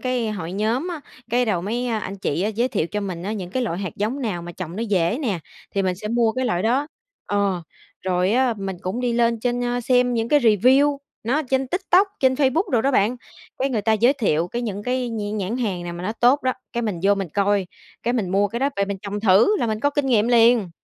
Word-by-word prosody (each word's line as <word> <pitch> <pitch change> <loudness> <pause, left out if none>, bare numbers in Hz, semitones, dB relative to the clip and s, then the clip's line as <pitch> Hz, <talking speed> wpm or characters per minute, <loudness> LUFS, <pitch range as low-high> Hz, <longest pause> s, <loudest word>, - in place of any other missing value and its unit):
cái 250 -4 -1
hội 180 -4 -5
nhóm 225 - -1
á, 340 -4 -5 0.3
cái 245 +1 +2
đầu 185 -6 0
mấy 240 +5 -2
anh 215 -4 -3
chị 185 +4 -1
giới 245 +2 +2
thiệu 160 - -1
cho 210 +4 -3
mình 185 -4 -5
á 205 +3 -3
những 185 -5 -5
cái 255 +5 -1
loại 180 -6 -2
hạt 190 -5 -5
giống 225 +7 -2
nào 180 -7 -2
mà 175 - -8
trồng 175 0 -7
nó 225 - -2
dễ 200 - +1
nè, 205 -8 -1 0.4
thì 195 - +1
mình 185 -1 0
sẽ 210 +2 -6
mua 230 -1 +2
cái 255 0 -2
loại 180 -5 0
đó 260 +6 +1 0.4
ờ, 200 -4 0 0.4
rồi 185 +1 +1
á 250 -1 +2
mình 195 -1 -4
cũng 190 +7 -3
đi 245 -1 0
lên 235 -1 +1
trên 245 0 -1
xem 250 0 +2
những 230 0 -1
cái 295 -1 +4
review, 255 +6 +4 0.3
nó 240 +5 0
ở 310 - 0
trên 265 0 +1
TikTok, 375 +3 +3
trên 260 -1 +4
Facebook 300 - +1
đồ 235 -3 +3
đó 275 - +2
bạn, 240 0 +2 0.4
cái 270 +1 0
người 220 -5 -1
ta 220 - +2
giới 235 +5 +4
thiệu 175 - 0
cái 240 +4 -3
những 205 -3 -4
cái 250 0 -1
nh 210 -1 -3
nhãn 205 +4 -2
hàng 200 -8 -2
nào 175 - -5
mà 175 - -7
nó 215 - -1
tốt 250 +5 +3
đó, 255 - +1 0.2
cái 240 -1 -2
mình 200 -6 -2
vô 200 +1 +4
mình 195 -3 -3
coi, 200 -2 +2 0.4
cái 240 - 0
mình 205 -7 -1
mua 200 +1 +2
cái 235 +3 -4
đó 280 +1 +2
về 200 - +2
mình 200 -1 -4
trồng 205 0 -4
thử 220 - +5
là 235 - 0
mình 215 0 -2
có 285 - +2
kinh 285 -1 -1
nghiệm 230 -3 +3
liền! 230 -5 +4
225 Hz, 255 wpm, -22 LUFS, 195-250 Hz, 0.4 s, thử